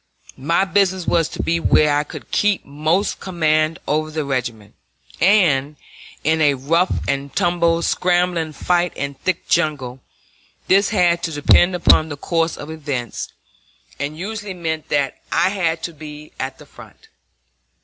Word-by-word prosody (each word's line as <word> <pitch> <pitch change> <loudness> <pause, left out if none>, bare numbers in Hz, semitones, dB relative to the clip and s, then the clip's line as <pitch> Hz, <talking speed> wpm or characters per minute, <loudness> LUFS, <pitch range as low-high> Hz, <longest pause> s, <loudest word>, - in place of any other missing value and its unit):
My 165 +8 +1
business 190 -1 +1
was 165 -2 +1
to - - -5
be 170 0 +1
where 150 -2 +3
I 145 - +1
could - - -11
keep 205 -2 +1
most 155 +8 0
command 155 -3 +1
over 155 +1 0
the 155 -1 -3
regiment, 120 -6 -3 0.5
and, 155 -7 +3 0.5
in 160 +1 +2
a 145 -2 +4
rough 165 +8 +1 0.2
and 140 0 -2
tumble, 170 -1 +2
scrambling 175 -3 +1
fight 175 +2 0
in 140 0 -3
thick 180 +5 -3
jungle, 145 -6 0 0.7
this 195 +1 +3
had 175 -5 +2
to 165 - -3
depend 175 +4 +4
upon 160 -2 +4
the 145 - -6
course 165 +2 -1
of 145 +2 -8
events, 140 -7 -4 0.7
and 145 +2 -4
usually 205 +1 -5
meant 160 -3 -4
that 140 -2 0
I - - +3
had 170 -4 -1
to 170 - -4
be 150 0 -10
at 130 0 -4
the - - -14
front. - - -16
160 Hz, 150 wpm, -20 LUFS, 145-175 Hz, 0.7 s, a